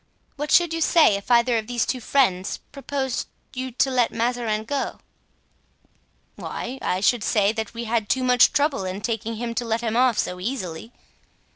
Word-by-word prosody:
What 295 +1 -4
should 345 -2 +4
you 330 - -2
say 320 -7 +5
if 200 +3 -7
either 235 -1 +4
of 215 - -8
these 240 -2 0
two 255 - -3
friends 195 -8 +1
proposed 275 -2 -3 0.2
to 255 - -7
you 260 0 -4
to 265 +2 +1
let 245 -2 +2
Mazarin 230 -2 -1
go?" 280 +4 -3 1.4
"Why, 255 +3 -6
I 185 - -1
should 225 +2 +2
say 205 -2 +2
that 220 0 -5
we 235 - -4
had 225 -2 -1
too 260 - +1
much 250 -1 +5
trouble 285 -7 +1
in 185 +2 -4
taking 225 0 -3
him 235 +1 -4
to 240 - -2
let 230 0 -1
him 225 -1 -2
off 250 -2 +3
so 180 - -2
easily." 190 -2 -5
235 Hz, 185 wpm, -23 LUFS, 220-260 Hz, 1.4 s, say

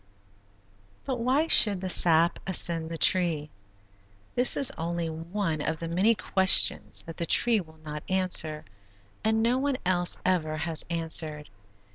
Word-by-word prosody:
But 260 -3 -4
why 260 +6 0
should 210 - +5
the 190 - -6
sap 170 -1 +3
ascend 165 -3 0
the 165 - -6
tree? 160 -5 +2 0.8
This 245 +1 +5
is 275 - +1
only 170 0 -4
one 165 0 -4
of 160 +1 -4
many 180 +7 0
questions 190 -2 +1
that 165 - -11
the 170 - -4
tree 235 +4 +3
will 160 -4 -12
not 150 +2 -9
answer 180 -5 -1 0.6
and 220 0 0
no 245 +3 0
one 280 -1 -2
else 175 -1 -1
ever 155 -4 -1
has 160 0 -3
answered. 160 -3 -1
170 Hz, 140 wpm, -26 LUFS, 160-205 Hz, 0.8 s, should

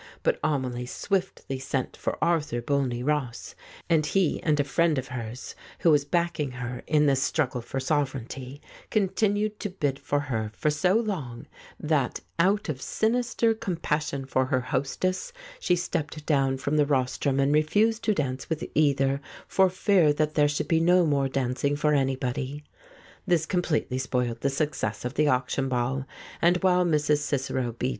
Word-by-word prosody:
But - - +1
Amelie 125 -5 -1
swiftly 185 -5 -2
sent 130 -1 -3
for - - -3
Arthur 160 -8 +1
Bolney 125 -1 -1
Ross, 140 -5 -2 0.3
and 160 -2 +3
he 175 +2 +1
and 150 -2 +1
a - - +4
friend 155 +2 +1
of 130 0 -3
hers, 120 -1 -6 0.3
who 165 - +5
was 145 -2 +3
backing 170 -2 0
her 125 -1 -5
in 150 -1 +3
this 135 -2 +3
struggle 135 -4 0
for 125 +3 -4
sovereignty, 135 -1 -3 0.3
con 205 -3 +2
tinued 210 +1 0
to 205 - -3
bid 145 -7 -2
for 145 - 0
her 110 -7 -3
for 150 +11 +1
so 180 +6 +2
long 175 - -2 0.3
that, 150 -5 0 0.2
out 195 +4 +3
of 140 -5 -4
sinister 230 0 +1
compassion 150 -8 -2
for 130 0 +1
her 130 -1 +1
hostess, 145 - -2 0.3
she 180 - +2
stepped 160 -3 -3
down 135 -3 +2
from 140 +3 -1
the 150 - +4
rostrum 135 0 0
and 140 +1 +3
refused 210 +9 +2
to 215 - +2
dance 130 -4 -3
with 160 -1 -2
either, 140 -2 +2 0.3
for 190 -1 +4
fear 185 -4 +3
that 155 +1 0
there 145 -1 +4
should 145 0 -2
be 165 - +3
no 175 +1 +4
more 140 -3 +1
dancing 135 +2 0
for 150 +1 +1
any 135 -2 +2
body. 130 +3 -4 0.6
This 170 -3 +2
completely 160 -7 0
spoiled 125 -2 -1
the 140 - +2
success 135 -7 -2
of 125 - -3
the 150 +1 +2
auction 130 0 0
ball, 130 +2 -1 0.4
and 175 +1 +4
while 180 -1 +4
Mrs. 150 -2 +2
Cicero 130 -4 -2
B. 125 +2 -2
145 Hz, 170 wpm, -26 LUFS, 130-170 Hz, 0.6 s, who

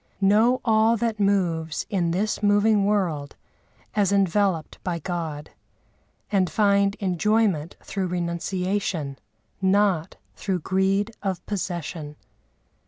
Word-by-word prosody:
(Know 215 +6 +4
all 220 0 +4
that 225 -1 -1
moves 175 -6 0
in 180 -4 0
this 200 +6 -1
moving 205 0 +3
world 175 -9 -1 0.6
as 205 -3 +2
enveloped 195 -4 +1
by 175 -2 -2
God; 160 -3 -5 0.8
and 190 -4 +2
find 200 -1 +2
enjoyment 195 -3 +1
through 195 -2 -3
renunciation, 175 -3 -2 0.4
not 190 -3 +2 0.2
through 190 -4 -2
greed 195 +4 +1
of 190 -3 -3
possession.) 170 -6 -4
195 Hz, 105 wpm, -24 LUFS, 170-205 Hz, 0.8 s, Know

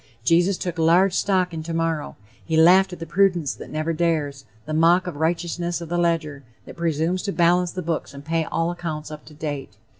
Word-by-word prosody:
Jesus 175 +7 +3
took 175 -2 -4
large 175 +4 +4
stock 185 -3 +1
in 160 - -4
tomorrow; 165 -1 -2 0.3
he 160 -1 -1
laughed 185 +4 +6
at 180 - -7
the 165 - -6
prudence 175 -3 +1
that - - -11
never 155 +2 -2
dares, 155 -5 -1 0.2
the 155 - -5
mock 170 +3 +4
righteousness 170 +1 -2
of 170 -2 -8
the 175 - -1
ledger 160 -5 -1 0.2
that - - -11
presumes 170 +2 -1
to 200 - -3
balance 175 0 +2
the 185 - -4
books 165 0 -3
and 140 0 -11
pay 165 +1 0
all 165 +3 -1
accounts 155 -3 -5
up 150 0 -9
to 150 - -14
date. 145 -3 -5
165 Hz, 200 wpm, -23 LUFS, 155-175 Hz, 0.3 s, laughed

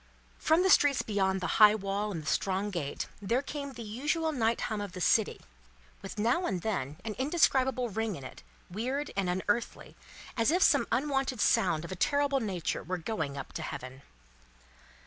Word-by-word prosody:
From 325 +3 +3
the 380 - +3
streets 285 -6 +5
beyond 190 -2 0
the - - -2 0.2
high 210 0 +9
wall 200 +1 -2
and 165 -5 -5
the - - -14
strong 195 +6 0
gate, 155 -7 -3 0.2
there 235 +7 0
came 280 -1 -5
the 235 - -8
usual 295 +9 -1
night 230 -5 0
hum 215 -3 -2
of 200 -3 -6
the - - -7
city, 210 +4 +2 0.6
with 195 +2 -8
now 240 +12 +1
and 180 -2 -2
then 155 -10 -2
an 220 - -3
indescribable 265 -4 +2
ring 220 -1 -2
in 140 - -9
it, - - -10 0.3
weird 255 +10 -3
and 195 -2 0
unearthly, 205 +6 -2 0.4
as 230 +1 +2
if 355 +4 +3
some - - +4
unwonted 270 -3 0
sounds 160 -5 +2
of 170 - -8
a - - -3
terrible 285 +6 +1
nature 190 - -2
were 185 +3 -3
going 160 -6 -3
up 140 - -7
to - - -4
Heaven. 130 0 -7
215 Hz, 185 wpm, -30 LUFS, 185-265 Hz, 0.6 s, high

